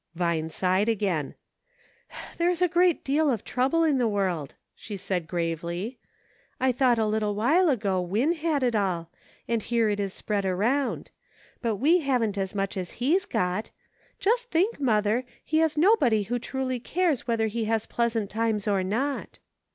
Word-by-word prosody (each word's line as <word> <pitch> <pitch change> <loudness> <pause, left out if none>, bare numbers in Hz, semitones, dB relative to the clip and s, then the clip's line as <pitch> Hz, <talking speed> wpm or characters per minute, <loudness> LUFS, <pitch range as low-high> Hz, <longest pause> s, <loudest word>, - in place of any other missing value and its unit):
Vine 165 -2 0
sighed 185 +5 +1
again. 190 -10 -1 1.0
"There 345 +1 +2
is 355 -2 0
a - - +5
very 345 - -18 0.2
great - - -22
deal 295 +2 +2
of 235 -6 -1
trouble 270 +7 +1
in 295 -5 +2
the 240 - +2
world," 185 -9 -1 0.2
she 205 -2 -8
said, 180 -3 -2
gravely. 170 +6 -3 0.3
" - - -36
I 260 0 +3
thought 250 -1 +3
a 220 - +2
little 210 -1 0
while 310 - +3
ago 200 -8 +1
Win 210 - +1
had 315 -4 -1
it 245 -2 +2
all, 180 -6 -1 0.4
and 230 -1 0
here 230 -1 +1
it 205 - -2
is 200 -1 -2
spread 205 +1 -2
around; 220 +9 0 0.5
but 230 -3 0
we 310 - +4
haven't 250 - 0
as 190 +1 -3
much 195 0 -2
as 180 -2 -4
he's 325 +11 +1
got. 180 +4 -1 0.5
Just 475 +4 +1
think, 380 +4 +1
mother, 220 -2 +2 0.2
he 315 - +1
has 320 -1 +1
nobody 295 - +4
who 240 +5 -2
truly 255 0 -3
cares 325 0 0
whether 230 -2 +1
he 220 +1 -2
has 220 0 0
pleasant 230 -3 -1
times 220 -1 -1
or 200 -2 +2
not." 255 +9 -2
225 Hz, 175 wpm, -26 LUFS, 195-275 Hz, 1.0 s, a